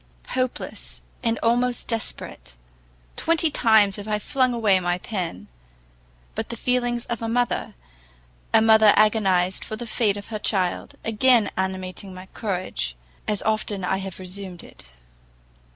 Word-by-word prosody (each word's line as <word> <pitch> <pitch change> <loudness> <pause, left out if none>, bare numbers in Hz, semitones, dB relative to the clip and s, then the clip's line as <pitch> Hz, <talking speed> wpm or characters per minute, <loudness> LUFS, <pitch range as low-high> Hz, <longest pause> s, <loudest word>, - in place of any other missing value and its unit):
Hopeless, 255 -1 -3 0.2
and 230 -2 0
almost 245 +1 +1
desperate, 65 - -3 0.6
twenty 330 -1 +2
times 220 -6 +4
have 205 +1 -7
I 210 -1 +1
flung 255 +4 +1
away 215 -5 +3
my 175 0 0
pen; 175 - -4 0.9
but - - -4
the - - -3
feelings 245 0 0
of 235 -2 -4
a 225 - -2
mother, 245 +1 0 0.8
a - - +6
mother 220 -1 +7
agonizing 195 -4 +3
for 215 - -5
the 240 +2 -6
fate 215 -3 +1
of 205 - -9
her 215 -2 -4
child, 185 -4 0
again 225 0 +4
animating 190 0 -4
my 185 +1 -9
courage, 185 - -3 0.3
as 210 -2 -1
often 215 -3 -1
I 190 +1 +1
have 190 -2 -6
resumed 185 -1 -5
it. - - -14
210 Hz, 140 wpm, -24 LUFS, 190-230 Hz, 0.9 s, mother